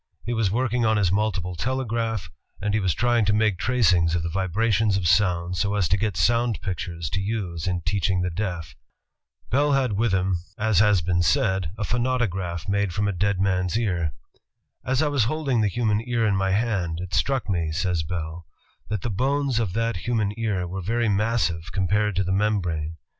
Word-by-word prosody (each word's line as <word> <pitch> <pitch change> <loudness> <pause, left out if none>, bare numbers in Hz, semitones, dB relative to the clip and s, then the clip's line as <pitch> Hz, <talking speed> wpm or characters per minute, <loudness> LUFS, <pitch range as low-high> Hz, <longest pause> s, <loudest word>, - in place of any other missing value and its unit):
He 120 - -2
was 110 -4 +1
working 120 +2 0
on 110 -1 +3
his 95 -4 +2
multiple 95 -3 0
telegraph, 115 -2 -2 0.3
and 105 +1 -1
he 110 - +2
was 95 -6 0
trying 120 +1 +2
to 105 - +2
make 105 -3 +2
tracings 95 -10 +3
of 85 - -1
the 85 - -3
vibrations 100 +2 +1
of 90 -3 0
sounds 90 -1 +2
so 100 +1 0
as 95 -5 +2
to 95 - +4
get 105 -2 -1
soimd 115 +6 +2
pictures 85 -4 -4
to 95 - -1
use 95 -6 -3
in 90 -1 -1
teaching 95 +2 0
the 90 - -1
deaf. 85 -4 -4 0.8
Bell 145 +3 +3
had 130 -5 +1
with 110 +2 +1
him, 95 -1 +1 0.2
as 110 -3 +2
has 105 -3 +4
been 90 +1 +1
said, 95 +1 +1
a 105 - -3
phonautograph 105 -8 -1
made 100 -2 0
from 105 +1 +1
a - - +1
dead 100 +1 0
man's 90 -1 +1
ear. 90 -9 -1 0.7
"As 130 +3 +1
I - - +2
was 140 -6 +2
holding 135 -3 0
the 105 - +3
human 105 +1 0
ear 120 -2 +1
in 105 -2 +2
my 95 0 +1
hand, 95 -5 0
it 90 0 -7
struck 125 - +1
me," 85 -6 -1
says 90 0 0
Bell, 80 0 -5 0.4
"that 105 -3 -2
the 120 - -2
bones 135 +3 0
of 105 -6 -1
that 115 -2 0
human 110 +1 -1
ear 105 -6 -1
were 95 +2 -5
very 115 +4 0
massive 100 -5 0
compared 100 +2 +1
to 95 - +1
the 95 - -2
membrane. 90 -6 -1
100 Hz, 195 wpm, -24 LUFS, 90-115 Hz, 0.8 s, to